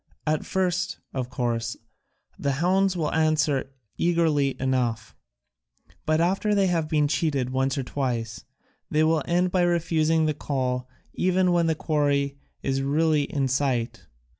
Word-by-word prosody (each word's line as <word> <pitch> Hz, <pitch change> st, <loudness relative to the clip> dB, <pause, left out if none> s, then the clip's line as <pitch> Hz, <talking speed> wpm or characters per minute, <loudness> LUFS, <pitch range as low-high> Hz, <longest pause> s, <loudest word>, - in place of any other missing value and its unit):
At 155 Hz, 0 st, -1 dB
first, 180 Hz, 0 st, -1 dB, 0.2 s
of 130 Hz, -2 st, -3 dB
course, 120 Hz, -2 st, -2 dB, 0.6 s
the 140 Hz, -, 0 dB
hounds 185 Hz, +5 st, +2 dB
will 160 Hz, -3 st, -1 dB
answer 155 Hz, -4 st, +1 dB, 0.3 s
eagerly 160 Hz, -5 st, +1 dB
enough, 125 Hz, -4 st, -1 dB, 0.9 s
but 155 Hz, 0 st, +2 dB
after 195 Hz, +5 st, +1 dB
they 200 Hz, -1 st, +3 dB
have 165 Hz, -4 st, 0 dB
been 150 Hz, -2 st, +2 dB
cheated 145 Hz, -4 st, 0 dB
once 130 Hz, +1 st, 0 dB
or 135 Hz, -, -1 dB
twice 120 Hz, -4 st, -3 dB, 0.5 s
they 155 Hz, +1 st, +2 dB
will 160 Hz, 0 st, +2 dB
end 180 Hz, +1 st, +1 dB
by 185 Hz, -, +2 dB
refusing 165 Hz, -2 st, +2 dB
the 155 Hz, -, +1 dB
call 130 Hz, -3 st, -2 dB, 0.2 s
even 185 Hz, 0 st, +2 dB
when 170 Hz, -1 st, +2 dB
the 160 Hz, -, +1 dB
quarry 140 Hz, -3 st, 0 dB, 0.2 s
is 135 Hz, 0 st, 0 dB
really 150 Hz, +1 st, +2 dB
in 140 Hz, -1 st, -1 dB
sight. 130 Hz, -3 st, -1 dB
150 Hz, 140 wpm, -25 LUFS, 135-170 Hz, 0.9 s, they